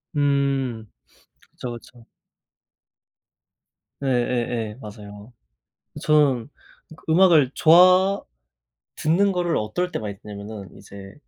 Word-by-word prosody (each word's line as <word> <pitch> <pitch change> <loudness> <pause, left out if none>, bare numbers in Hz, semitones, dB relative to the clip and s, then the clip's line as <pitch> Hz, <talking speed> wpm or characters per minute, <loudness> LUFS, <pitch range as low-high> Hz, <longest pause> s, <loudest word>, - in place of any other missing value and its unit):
음 135 -6 -1 0.6
그쵸, 125 -1 -7
그쵸. 120 0 -19 2.0
예예예 120 -3 -1
맞아요. 105 +1 -11 0.7
저는 145 -6 +2 0.6
음악을 160 -6 +5
좋아 185 +4 +5 0.7
듣는 190 +6 +1
거를 175 -2 -1
어떨 180 +13 -3
때 - - -3
많이 105 -2 -6
듣냐면은 105 -1 -9
이제 95 0 -12
125 Hz, 175 characters per minute, -22 LUFS, 105-160 Hz, 2.0 s, 음악을